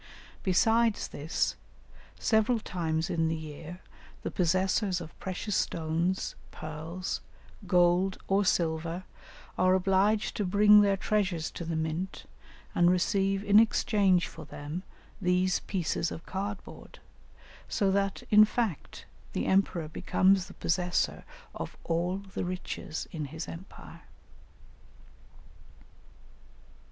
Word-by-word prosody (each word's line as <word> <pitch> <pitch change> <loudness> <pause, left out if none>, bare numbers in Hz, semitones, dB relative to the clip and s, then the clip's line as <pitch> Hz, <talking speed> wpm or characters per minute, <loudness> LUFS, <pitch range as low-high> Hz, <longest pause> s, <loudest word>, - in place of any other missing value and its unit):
Besides 225 +4 +2
this, 150 +3 -1 0.6
several 220 +2 +2
times 165 -4 -2
in 165 -1 +1
the 160 - 0
year 160 +3 -8 0.4
the - - -3
possessors 185 +2 +1
of 165 -2 -9
precious 190 +2 -3
stones, 165 +3 0 0.2
pearls, 160 +4 -5 0.5
gold, 180 +1 +3
or 195 +1 +3
silver, 165 0 0 0.6
are 185 0 +5
obliged 195 +3 +2
to 210 - 0
bring 205 +2 +6
their 200 -1 +3
treasures 190 -6 0
to 170 - -6
the 165 0 -2
mint 160 +4 -3 0.5
and 175 0 +4
receive 195 +2 +1
in 205 0 +6
exchange 200 -5 +3
for - - -10
them 150 +3 -6 0.4
these 180 0 +2
pieces 170 -3 -2
of 165 - -7
card 200 +1 -4
board, - - -13 0.7
so 195 -3 +1
that, 195 0 0
in 215 0 +9
fact, 215 - -2 0.3
the - - -1
emperor 185 -4 +1
becomes 190 +4 +2
the 190 - -12
possessor 175 +1 0 0.3
of - - -6
all 175 +3 0
the 195 -1 -6
riches 180 -3 -5
in 155 -3 -4
his 160 +4 -6
empire. 170 -1 -10
185 Hz, 115 wpm, -29 LUFS, 165-195 Hz, 0.7 s, in